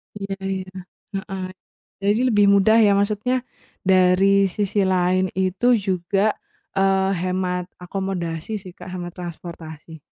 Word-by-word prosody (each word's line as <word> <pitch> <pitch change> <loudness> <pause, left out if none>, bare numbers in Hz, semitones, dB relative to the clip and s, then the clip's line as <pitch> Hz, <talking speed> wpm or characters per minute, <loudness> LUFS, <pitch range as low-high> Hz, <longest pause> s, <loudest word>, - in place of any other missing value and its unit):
Ya 195 -1 -4
ya. 190 -1 -4 0.4
Heeh. 195 -1 -4 0.5
Jadi 205 +3 +1
lebih 205 -3 +4
mudah 200 +2 +5
ya, 210 -3 +5
maksudnya 210 +5 +1 0.4
dari 190 +1 +4
sisi 200 +1 0
lain 185 0 +1
itu 190 +6 +2
juga, 195 0 0 0.4
eee, 195 0 +3
hemat 180 0 -1 0.2
akomodasi 185 +1 -4
sih 185 -2 -10
Kak, 180 - -11
hemat 175 -1 -6
transportasi. 165 -2 -8
190 Hz, 120 wpm, -22 LUFS, 180-200 Hz, 0.5 s, mudah